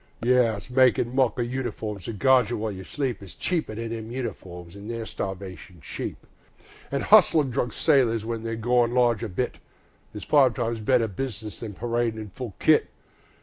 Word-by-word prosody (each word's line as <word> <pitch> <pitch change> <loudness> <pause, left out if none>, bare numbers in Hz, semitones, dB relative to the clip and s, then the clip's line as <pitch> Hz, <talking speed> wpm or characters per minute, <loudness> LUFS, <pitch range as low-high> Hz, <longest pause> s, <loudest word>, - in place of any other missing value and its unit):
Yes, 120 -4 +2
makin' 125 -1 +3
mock 130 -1 +2
o' 120 - +1
uniforms 115 -5 -4
that 115 -3 -5
guard 130 -2 +4
you 120 - -2
while 110 0 -2
you 95 -1 -7
sleep 130 +3 -3
Is 100 - -11
cheaper 165 -11 -2
than 115 +1 -4
them 110 -1 -6
uniforms, 95 -8 -6
an' 100 +1 -10
they're 115 -1 -4
starvation 95 -3 -7
cheap; 70 - -6 0.6
An' - - -1
hustlin' 150 -5 +5
drunken 125 -1 -2
soldiers 120 -8 +3
when 115 -1 -3
they're 115 0 -3
goin' 120 +1 +2
large 120 -3 +3
a 115 - -3
bit 90 - -3 0.6
Is 105 - -6
five 135 -5 +4
times 115 -1 -2
better 115 +1 +2
business 110 0 -5
than 110 -4 -7
paradin' 120 0 -1
in 105 -1 -7
full 120 -2 -7
kit. - - +4
115 Hz, 180 wpm, -25 LUFS, 105-125 Hz, 0.6 s, hustlin